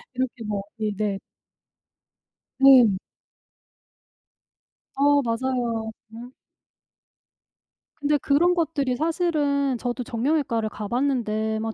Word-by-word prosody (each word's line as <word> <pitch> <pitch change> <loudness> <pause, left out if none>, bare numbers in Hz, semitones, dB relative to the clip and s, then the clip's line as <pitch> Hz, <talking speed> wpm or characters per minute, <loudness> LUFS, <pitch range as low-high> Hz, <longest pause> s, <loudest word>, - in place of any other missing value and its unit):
이렇게 250 -2 -3
뭐 205 -2 -3 0.2
네네. 210 -2 -2 1.4
네. 260 -6 +7 2.0
어 285 +1 +4
맞아요. 230 -2 -2 0.2
음. 240 +3 -10 1.7
근데 295 0 +2
그런 305 +6 +2
것들이 290 -6 -1
사실은 295 -5 0
저도 245 +1 -3
정형외과를 235 -2 -1
가 210 -1 -6
봤는데 220 -4 -1
막 225 0 -3
250 Hz, 175 characters per minute, -24 LUFS, 225-285 Hz, 2.0 s, 네